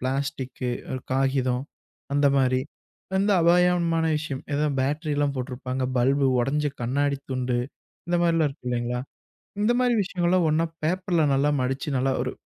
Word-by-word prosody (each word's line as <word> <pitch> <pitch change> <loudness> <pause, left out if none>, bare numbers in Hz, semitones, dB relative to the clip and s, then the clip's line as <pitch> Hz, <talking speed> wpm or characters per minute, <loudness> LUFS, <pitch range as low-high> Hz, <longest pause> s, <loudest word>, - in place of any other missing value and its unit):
Plastic, 130 -1 -3 0.4
காகிதம் 130 -1 +1 0.5
அந்த 145 0 +4
மாரி 130 -1 +2 0.6
வந்து 200 +2 +3
அபாயமான 170 -1 +3
விஷயம். 145 -3 -4
ஏதோ 150 +1 +1
பேட்டரிலாம் 145 +1 0
போட்ருப்பாங்க, 130 0 -4
பல்பு, 135 +3 +3
ஒடைஞ்ச 145 +4 0 0.2
கண்ணாடி 140 +3 0
துண்டு 125 -1 -1 0.5
இந்த 175 - +1
மாரிலாம் 165 -2 +3
இருக்கு 135 -2 -13
இல்லைங்களா? 120 0 -1 0.6
இந்த 215 +3 +3
மாரி 250 -1 +3
விஷயங்கள்லாம் 180 -2 +1
ஒண்ணா 160 +2 +2 0.2
பேப்பர்ல 180 0 +1
நல்லா 140 +2 +2
மடிச்சு 135 +3 -2
நல்லா 135 +1 +1
ஒரு 125 - -3
140 Hz, 130 wpm, -25 LUFS, 130-165 Hz, 0.6 s, அந்த